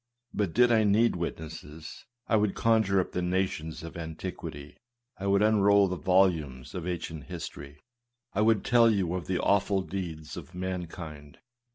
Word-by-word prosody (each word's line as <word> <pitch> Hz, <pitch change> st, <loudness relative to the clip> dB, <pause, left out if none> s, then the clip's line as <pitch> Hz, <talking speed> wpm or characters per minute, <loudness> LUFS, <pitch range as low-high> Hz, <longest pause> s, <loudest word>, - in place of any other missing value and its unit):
But, 100 Hz, -6 st, -1 dB
did 120 Hz, +1 st, +5 dB
I 110 Hz, -2 st, +4 dB
need 105 Hz, +2 st, +3 dB
wit 85 Hz, -1 st, -3 dB
nesses, 80 Hz, 0 st, -10 dB, 0.2 s
I -, -, +2 dB
would 105 Hz, -2 st, +2 dB
conjure 110 Hz, -4 st, +3 dB
up 90 Hz, -, -1 dB
the 90 Hz, -, -2 dB
nations 90 Hz, -4 st, -2 dB
of 85 Hz, +1 st, -8 dB
antiquity; 80 Hz, -3 st, -7 dB, 0.4 s
I 100 Hz, -, -3 dB
would 100 Hz, +1 st, +3 dB
unroll 100 Hz, -2 st, +5 dB
the 90 Hz, -, -2 dB
volume 85 Hz, -9 st, +2 dB
of 90 Hz, -1 st, -5 dB
ancient 85 Hz, -4 st, -4 dB
history; 75 Hz, -5 st, -8 dB, 0.6 s
I 100 Hz, -, +1 dB
would 110 Hz, -1 st, +3 dB
tell 120 Hz, -1 st, +5 dB
you 95 Hz, -6 st, +1 dB
of 90 Hz, -4 st, -4 dB
the 95 Hz, -, 0 dB
awful 100 Hz, -1 st, +2 dB
deeds 85 Hz, -6 st, -6 dB
of 90 Hz, -, -10 dB
mankind. 85 Hz, -5 st, -6 dB
90 Hz, 165 wpm, -28 LUFS, 80-100 Hz, 0.6 s, did